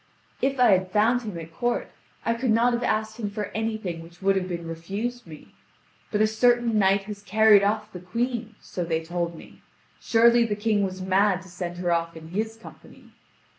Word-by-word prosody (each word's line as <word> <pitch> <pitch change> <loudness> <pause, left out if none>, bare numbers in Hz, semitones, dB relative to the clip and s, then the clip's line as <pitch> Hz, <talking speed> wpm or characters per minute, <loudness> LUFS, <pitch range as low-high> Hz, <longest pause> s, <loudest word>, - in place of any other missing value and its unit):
"If 270 0 0
I 245 -3 +6
had 185 -1 +2
found 220 +5 +3
him 210 -7 -6
at 165 0 -9
court, 240 +5 -1 0.3
I 230 - +2
could 235 +2 -2
not 235 +2 +4
have 240 - -1
asked 220 -1 -1
him 210 -3 -2
for 210 0 -5
anything 220 -6 -3
which 170 +1 -14
would 195 0 +2
have 185 -1 -1
been 170 -2 -5
refused 200 +8 -5
me; 155 -2 -13 0.6
but 210 - +1
a - - +6
certain 235 0 +2
knight 195 0 +3
has 205 0 -8
carried 210 +1 +5
off 210 +1 0
the 180 - -7
Queen, 230 +4 -3
so 180 - -5
they 165 -1 -1
told 170 0 -3
me; - - -14 0.4
surely 235 +1 +4
the 215 -3 -1
King 210 0 +1
was 185 -1 -3
mad 190 0 +2
to 190 - -14
send 175 0 -6
her 175 -1 -1
off 170 -1 -1
in 160 0 -11
his 220 +5 -2
company. 225 - -15
205 Hz, 205 wpm, -25 LUFS, 180-225 Hz, 0.6 s, I